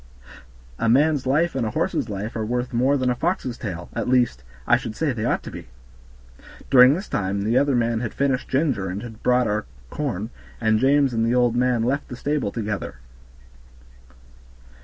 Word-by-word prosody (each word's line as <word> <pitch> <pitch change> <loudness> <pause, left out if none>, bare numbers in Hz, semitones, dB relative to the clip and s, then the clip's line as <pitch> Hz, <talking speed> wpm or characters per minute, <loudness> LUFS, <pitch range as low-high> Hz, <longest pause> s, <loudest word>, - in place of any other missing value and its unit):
A 115 - +1
man's 140 +2 +3
life 160 +6 +2
and 130 - -1
a 110 - -1
horse's 110 - -1
life 105 +3 -5
are 110 - -2
worth 125 +3 -2
more 130 +4 +2
than 130 -1 +1
a - - -1
fox's 160 -4 -2
tail; 90 -7 -6
at - - -2
least, 120 - +2 0.2
I - - +5
should 115 -3 -4
say 150 -1 0
they 115 -2 -3
ought - - 0
to - - -8
be." - - -9 1.0
During 130 +1 +8
this 190 +5 -5
time 100 0 -2
the 110 +3 0
other 140 0 +3
man 115 -1 +1
had 115 -2 -3
finished 135 -2 -1
Ginger 130 - 0
and 100 +4 -5
had 115 -2 -10
brought 125 0 +3
our 105 0 -1 0.3
corn, 120 -7 -3 0.3
and 110 -1 +2
James 135 +1 +3
and 115 -1 +1
the 115 +2 +1
old 120 -1 +2
man 125 -2 +2
left 135 +5 -1
the 125 - -7
stable 145 -4 -1
together. 105 -3 -4
120 Hz, 190 wpm, -23 LUFS, 110-135 Hz, 1.0 s, During